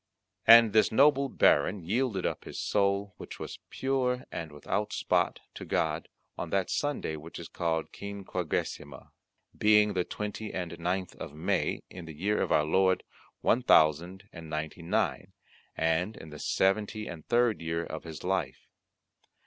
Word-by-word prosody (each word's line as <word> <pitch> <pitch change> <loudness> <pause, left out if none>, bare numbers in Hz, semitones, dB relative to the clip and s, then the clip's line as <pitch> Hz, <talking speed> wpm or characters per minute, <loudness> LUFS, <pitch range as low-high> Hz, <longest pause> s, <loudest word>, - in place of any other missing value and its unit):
And 115 -2 +9
this 110 -1 +4
noble 140 +2 +4
Baron 105 -4 +3
yielded 110 +1 0
up - - -3
his - - -8
soul, 100 0 0
which - - -9
was - - -7
pure 130 -2 -1
and 80 -2 -5
without 75 -1 -3
spot, - - 0
to - - -8
God, - - -1 0.3
on - - -4
that 95 -2 0
Sunday 145 - -1
which 80 +2 -9
is - - -7
called 80 -2 -2
Quinquagesima, 95 -8 -4 0.4
being 105 0 +4
the 90 -2 +1
twenty 105 +3 -5
and 85 -2 -4
ninth 90 +2 -2
of 75 - -8
May, 80 - -1
in 90 -2 -9
the 80 -2 -9
year 100 +7 0
of - - -1
our 75 - +4
Lord 95 +3 +2 0.4
one 120 - +3
thousand 90 - +3
and 85 -2 -9
ninety 80 +2 -4
and 85 - -10
nine, - - 0 0.4
and 80 +6 0
in 80 - -11
the 75 - -9
seventy 105 +5 0
and 80 -3 -8
third 120 -3 +2
year 80 +1 -2
of 80 - -7
his 80 -3 -8
life. - - -2
95 Hz, 160 wpm, -29 LUFS, 80-105 Hz, 0.4 s, And